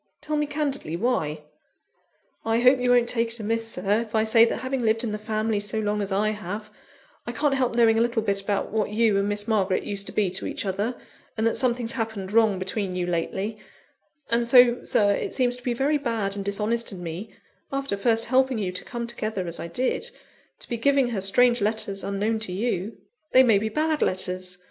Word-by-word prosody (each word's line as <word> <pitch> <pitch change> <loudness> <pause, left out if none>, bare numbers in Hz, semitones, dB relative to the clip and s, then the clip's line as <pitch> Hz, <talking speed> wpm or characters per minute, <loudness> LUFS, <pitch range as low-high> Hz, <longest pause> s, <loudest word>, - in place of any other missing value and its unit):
tell 305 - -3
me 295 0 0
candidly 285 - -2
why?" 160 -9 -1 1.0
"I 225 +1 +1
hope 255 +1 +5
you 250 0 0
won't 245 -1 +4
take 230 -1 0
it 230 +1 -4
amiss, 225 +1 -1
Sir, 205 +1 0
if 225 -1 -6
I 220 - +3
say 225 +1 +5
that - - -2
having 260 0 -2
lived 225 0 +1
in 230 - -2
the 210 - -4
family 215 0 -1
so 205 +2 -4
long 210 0 -1
as 200 0 -4
I 210 +2 +1
have, 210 +1 -6 0.6
I - - -2
can't 295 -2 +1
help 255 -3 0
knowing 225 -1 +4
a - - +3
little 235 -1 +1
about 200 0 -1
what 215 -1 0
you 215 -1 +2
and 200 +1 0
Miss 205 +1 -2
Margaret 195 -4 +1
used 200 -1 -3
to - - -3
be 200 -4 +1
to 190 - -4
each - - -4
other, 205 +6 -1 0.4
and 220 - 0
that 230 - +2
something's 240 -2 +1
happened 220 -6 -4
wrong 220 -3 +4
between 185 0 -2
you 180 -1 -1
lately; 190 +5 -2 0.7
and 235 0 +2
so, 245 0 +6
Sir, 205 -1 +3
it - - -3
seems 245 -2 +2
to 250 - -14
be 240 -1 -1
very 290 +4 +1
bad 225 -7 -1
and 200 - -4
dishonest 210 +4 0
in 180 -3 -8
me 180 +5 -7 0.4
(after 275 -5 -1
first 225 +3 +1
helping 260 0 +2
you 195 -4 -2
to 185 - -5
come 235 -1 -5
together, 215 -5 -4
as 170 -1 -6
I - - -5
did), 255 - -1 0.5
to - - -7
be 235 - -3
giving 275 +1 +3
her 215 -5 -2
strange 240 +5 +3
letters, 205 -2 -1
unknown 210 +3 -1
to 215 -4 -3
you. 205 +1 -2 0.4
They 260 - +8
may 225 -5 +4
be 220 +2 -2
bad 310 +5 0
letters. 185 -1 -2
220 Hz, 215 wpm, -25 LUFS, 200-240 Hz, 1.0 s, They